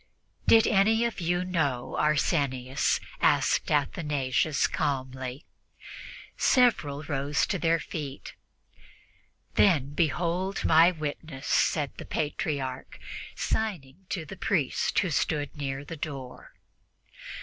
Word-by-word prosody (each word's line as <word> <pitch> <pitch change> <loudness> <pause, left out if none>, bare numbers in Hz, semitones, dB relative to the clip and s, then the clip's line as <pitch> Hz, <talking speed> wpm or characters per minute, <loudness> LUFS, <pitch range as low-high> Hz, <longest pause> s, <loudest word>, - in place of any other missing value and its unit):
"Did 225 0 +7
any 220 +3 +3
of 235 - -3
you 175 +2 0
know 145 -9 -1
Arsenius?" 140 -4 +1 0.2
asked - - +2
Athanasius 145 -1 +1
calmly. 130 -2 -3 0.9
Several 155 - +2
rose 145 0 0
to 190 -1 -2
their 165 0 +2
feet. 145 -2 -6 1.2
"Then, 145 -8 +3
behold 175 +4 -1
my 165 +2 +7
witness," 155 -4 -6
said 150 -3 +1
the - - -7
Patriarch, 140 -3 -3 0.4
signing 185 -5 -3
to 170 -5 -3
a 195 - -8
priest 165 -7 0
who 185 -4 +2
stood 150 0 -1
near 140 -1 -4
the 165 +2 -7
door. 135 -4 -7
150 Hz, 105 wpm, -28 LUFS, 140-175 Hz, 1.2 s, Did